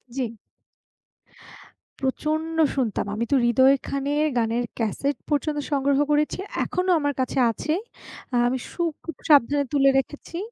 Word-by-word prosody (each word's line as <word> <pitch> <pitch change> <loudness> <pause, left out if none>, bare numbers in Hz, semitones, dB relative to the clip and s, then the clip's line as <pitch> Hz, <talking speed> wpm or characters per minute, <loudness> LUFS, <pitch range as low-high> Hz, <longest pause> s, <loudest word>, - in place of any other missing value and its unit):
জি। 235 -4 -3 1.6
প্রচন্ড 310 +4 -1 0.2
শুনতাম। 245 -7 -1
আমি 230 +2 -1
তো - - +5
হৃদয় 260 +3 +5
খানের 285 +2 0
গানের 230 +1 +1
ক্যাসেট 250 +5 -1
পর্যন্ত 295 0 0
সংগ্রহ 280 0 +2
করেছি। 300 +4 +1 0.3
এখনো 365 0 -2
আমার 290 -1 0
কাছে 260 +1 0
আছে। 305 +7 -2 0.7
আমি 255 +2 0
সু - - -5 0.2
খুব 330 - -6
সাবধানে 285 0 +5
তুলে 275 -1 +5
রেখেছি 295 +4 -6
280 Hz, 125 wpm, -24 LUFS, 255-295 Hz, 1.6 s, তো